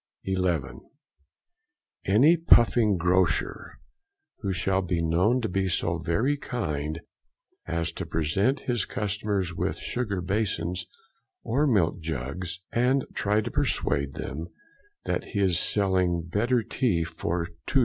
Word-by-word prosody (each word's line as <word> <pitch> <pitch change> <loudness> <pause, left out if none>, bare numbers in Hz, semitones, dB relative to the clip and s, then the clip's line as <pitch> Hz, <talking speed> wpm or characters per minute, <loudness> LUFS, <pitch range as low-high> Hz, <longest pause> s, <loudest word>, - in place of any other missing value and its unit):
11. 85 -9 -1 1.3
Any 130 - +6
puffing 120 - +4
Grocer 90 0 0 0.6
who 100 -3 -2
shall 95 +1 +1
be 90 -2 -1
known 90 +10 +2
to 115 - -1
be 95 -1 0
so 85 -2 0
very 110 - +1
kind 80 - -3 0.7
as 85 0 -1
to - - -6
present 95 - +1
his 120 -3 -1
customers 100 -3 -2
with - - -2
sugar 110 -6 -2
basins 90 -1 -1 0.6
or 145 +5 +1
milk 90 - +2
jugs, 80 +4 -4
and 125 +3 +2
try 105 +1 +1
to - - -5
persuade 70 -2 0
them 80 +4 -5 0.6
that - - -1
he - - +1
is 95 -4 +3
selling 95 -4 +2
better 115 +8 +1
tea 95 -11 0
for 85 +1 -3 0.2
2s. 135 - +3
95 Hz, 125 wpm, -27 LUFS, 85-110 Hz, 1.3 s, Any